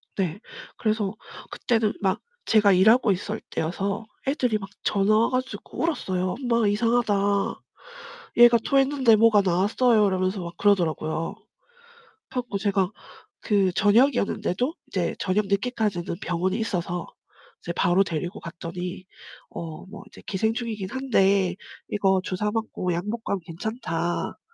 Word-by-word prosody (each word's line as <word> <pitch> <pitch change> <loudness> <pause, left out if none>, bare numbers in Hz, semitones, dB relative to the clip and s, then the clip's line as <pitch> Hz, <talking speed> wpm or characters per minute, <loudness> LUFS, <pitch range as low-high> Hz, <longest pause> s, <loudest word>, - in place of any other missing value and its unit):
네. 185 -1 -2 0.4
그래서 215 -3 -1 0.3
그때는 225 -3 0
막 190 +1 0 0.2
제가 210 -2 +5
일하고 215 +5 +5
있을 205 +3 -3
때여서 195 +6 -2 0.2
애들이 250 -5 +1
막 195 -1 -8
전화 205 +1 +3
와 230 - +3
가지고 255 +1 -4
울었어요. 185 - -1 0.2
"엄마 230 -2 +3
이상하다. 230 +1 +2 1.2
얘가 240 0 +8
토했는데 270 -4 +4
뭐가 220 -1 +5
나왔어요." 205 +5 +3
이러면서 185 0 -1
막 170 0 -8
그러더라고요. 165 -5 +1
그래 - - -30 0.9
갖고 245 -5 -3
제가 195 -2 +1 0.5
그 200 -4 +2
저녁이었는데도 220 - +2
이제 - - -1
저녁 200 +2 0
늦게까지 210 -1 0
하는 170 - -5
병원이 180 +2 -1
있어서 175 -5 -2 0.6
이제 170 - -4
바로 180 +3 +3
데리고 175 +4 -4
갔더니 175 +2 -6 0.5
어 160 -2 -7
뭐 195 - -10
이제 - - -15
"기생충이기는 220 0 -2
한데 195 -8 +2 0.3
이거 190 -2 +2
주사 205 +3 -1
맞고 215 -5 -2
약 175 +4 -3
먹고 225 +1 -3
하면 200 - -1
괜찮다." 175 -2 -3
200 Hz, 310 characters per minute, -25 LUFS, 185-225 Hz, 1.2 s, 얘가